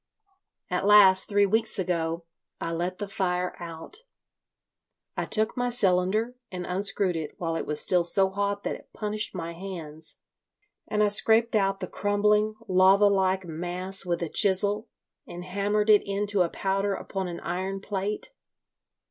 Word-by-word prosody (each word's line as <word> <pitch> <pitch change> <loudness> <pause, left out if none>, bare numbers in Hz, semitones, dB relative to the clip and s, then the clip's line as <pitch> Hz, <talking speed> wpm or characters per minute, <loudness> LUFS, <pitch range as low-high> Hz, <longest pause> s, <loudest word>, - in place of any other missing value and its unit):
"At - - -1
last, 195 -2 +7
three 205 -1 +3
weeks 220 +3 +2
ago, 170 -3 -2 0.3
I 165 - -4
let 175 +2 -3
the 205 - -5
fire 180 -3 -2
out. 170 - -8 1.2
I - - -2
took 220 0 0
my 245 -1 -1
cylinder 210 +1 +1 0.2
and 180 -1 -5
unscrewed 190 0 0
it 160 -2 -5
while 165 -2 -3
it - - -4
was 150 0 +1
still 180 -2 +2
so 190 +3 +4
hot 200 +1 -2
that - - -2
it - - -12
punished 210 -1 -2
my 170 -1 -5
hands, 165 -4 -7 0.7
and 210 0 +1
I - - +4
scraped 225 +3 +3
out 195 -1 +1
the - - -3
crumbling 210 +1 +1
lava 190 +2 +5
like 190 -1 +1
mass 180 +4 -3
with 175 -2 -2
a 165 - -3
chisel, 205 +5 +2 0.4
and 175 +1 -8
hammered 205 +3 0
it 210 - +6
into 200 0 0
a 175 - +2
powder 195 +2 -1
upon 190 -1 -5
an 170 -1 -6
iron 190 +3 -3
plate. 200 - -4
195 Hz, 155 wpm, -26 LUFS, 180-205 Hz, 1.2 s, last